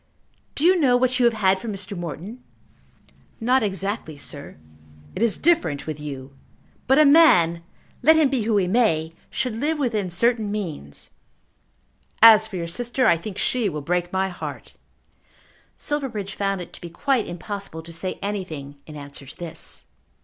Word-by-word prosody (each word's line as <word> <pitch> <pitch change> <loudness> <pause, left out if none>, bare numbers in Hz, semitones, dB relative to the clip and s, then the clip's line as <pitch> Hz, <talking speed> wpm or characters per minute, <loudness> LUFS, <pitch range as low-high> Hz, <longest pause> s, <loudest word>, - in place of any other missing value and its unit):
Do 295 - +1
you 365 +1 +5
know 255 -5 +4
what 255 0 +1
you 245 - +4
have 235 -1 +3
had 190 -3 +2
from 225 +2 -5
Mr. 195 0 -4
Morton?" 175 - -7 1.0
"Not 255 +3 +3
exactly, 195 -5 -3
sir." 145 - -9 0.6
"It - - -4
is 230 -3 +2
different 315 - +1
with 155 -1 -5
you. 140 -2 -7 0.5
But 265 +1 +5
a 305 - +7
man, 180 - +6 0.4
let 320 +2 +6
him 315 -2 +5
be 265 -3 0
who 215 -1 +1
he 195 - +2
may, 180 -6 +2 0.2
should 250 -4 -2
live 300 +7 -1
within 220 -9 -1
certain 220 +4 +1
means. 165 - -5 1.1
As 220 -1 +8
for 215 - -9
your 170 -2 -3
sister, 245 +8 -1
I 170 - +6
think 185 +4 -7
she 235 -1 +1
will 150 -3 -5
break 175 +2 -1
my 190 0 0
heart." 180 - -8 1.0
Silverbridge 235 -9 -3
found 195 -2 -1
it 175 - -10
to - - -13
be 175 - -7
quite 250 +7 0
impossible 180 -2 -6
to 170 +1 -11
say 185 +3 -4
anything 160 -9 -5
in 155 - -10
answer 140 -1 -9
to 150 - -12
this. 170 -3 -7
200 Hz, 170 wpm, -23 LUFS, 170-245 Hz, 1.1 s, As